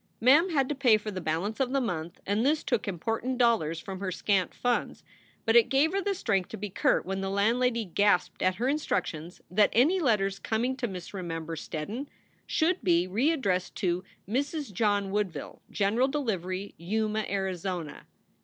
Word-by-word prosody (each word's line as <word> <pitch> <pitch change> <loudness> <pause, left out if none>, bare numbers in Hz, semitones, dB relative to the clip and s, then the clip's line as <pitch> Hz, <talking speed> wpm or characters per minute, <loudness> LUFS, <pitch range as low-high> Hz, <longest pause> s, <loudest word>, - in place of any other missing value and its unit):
MI 250 +3 +5
m 325 +7 +5
had 275 -6 +2
to 295 - -1
pay 255 -6 +4
for 215 0 -6
the 185 -2 -5
balance 170 - -2
of 265 -1 0
the 275 - +3
month 175 -8 -3
and 205 +3 +1
this 295 +3 +2
took 240 -5 -1
important 225 +7 -2
dollars 220 -10 +2
from 190 +1 -7
her 190 -1 -3
scant 190 0 0
funds; 245 -1 -1 0.4
but 225 - +3
it 235 -2 +6
gave 280 +4 +3
her 395 +1 0
the 395 +1 -1
strength 195 - 0
to 220 - -6
be 205 -1 -5
curt - - +2
when 195 +1 -3
the 195 - -2
landlady 230 +4 +1
gasped 200 +1 +1
at 185 0 +2
her 240 +5 -1
instructions 180 - -2
that 205 +2 +4
any 310 +11 +4
letters 195 - +1
coming 240 +4 -1
to 245 - -1
Miss 185 -3 -8
Remember 165 -3 -4
Steddon 200 - -5 0.4
should 335 -1 +1
be 175 -2 +3
readdressed 210 - 0
to 180 -2 -1 0.2
"Mrs. 280 - -2
John 205 -1 +1
Woodville, 190 -8 -3
General 220 +6 +2
Delivery, 200 - -3
Yuma, 215 +4 -1
Arizona." 185 -4 -3
210 Hz, 180 wpm, -28 LUFS, 185-250 Hz, 0.4 s, it